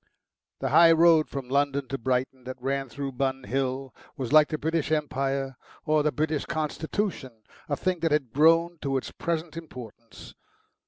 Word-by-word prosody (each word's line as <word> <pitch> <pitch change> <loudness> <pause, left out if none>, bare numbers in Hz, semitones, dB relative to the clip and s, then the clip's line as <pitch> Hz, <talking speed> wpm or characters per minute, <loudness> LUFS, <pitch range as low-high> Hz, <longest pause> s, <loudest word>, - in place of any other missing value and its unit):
The - - -1
High 170 0 +7
Road 165 -1 +5
from 135 -3 -5
London 140 0 0
to 135 - -2
Brighton 130 +1 -1
that 130 0 -7
ran 135 +1 -2
through 140 +3 -5
Bun 135 0 -2
Hill 130 0 -2 0.2
was 130 +1 -3
like 155 -1 +7
the 155 - -3
British 160 0 -1
Empire 135 -3 -1 0.3
or 155 -1 +3
the 150 0 +1
British 155 -1 -1
Constitution 155 - -3 0.3
a 145 - 0
thing 185 -2 -1
that 165 -1 0
had 140 -6 0
grown 165 +3 +4
to 135 -1 0
its 130 - -5
present 165 -1 -3
importance. 120 -8 -11
140 Hz, 165 wpm, -26 LUFS, 130-160 Hz, 0.3 s, High